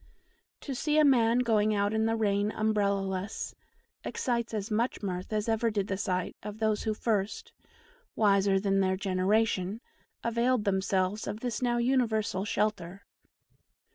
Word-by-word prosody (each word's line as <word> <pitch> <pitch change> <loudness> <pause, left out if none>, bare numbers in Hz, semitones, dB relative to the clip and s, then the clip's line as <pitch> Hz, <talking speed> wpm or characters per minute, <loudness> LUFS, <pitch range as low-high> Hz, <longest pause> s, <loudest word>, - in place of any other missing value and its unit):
To 275 - -5
see 300 +4 0
a 305 - +6
man 240 -4 +4
going 215 -3 +2
out 205 +1 +1
in 220 0 +1
the 225 - +1
rain 205 -2 +1
umbrella 210 -2 +1
less 190 +1 -4 0.5
excites 235 -2 -2
as 215 0 -4
much 230 +1 -1
mirth 185 0 -4
as 215 0 -1
ever 225 +1 +1
did 205 -3 -1
the 195 - 0
sight 185 -2 -2
of 210 0 -7
those 220 -1 0
who 215 -1 0
first 210 -2 -2 0.6
wiser 200 -2 +3
than 195 0 +1
their 190 -1 +1
generation 195 +1 0 0.4
availed 235 0 +1
themselves 190 +1 0
of 210 +2 -5
this 245 -3 -3
now 240 -1 +1
universal 230 -6 +1
shelter. 200 -3 -2
210 Hz, 150 wpm, -29 LUFS, 195-225 Hz, 0.6 s, a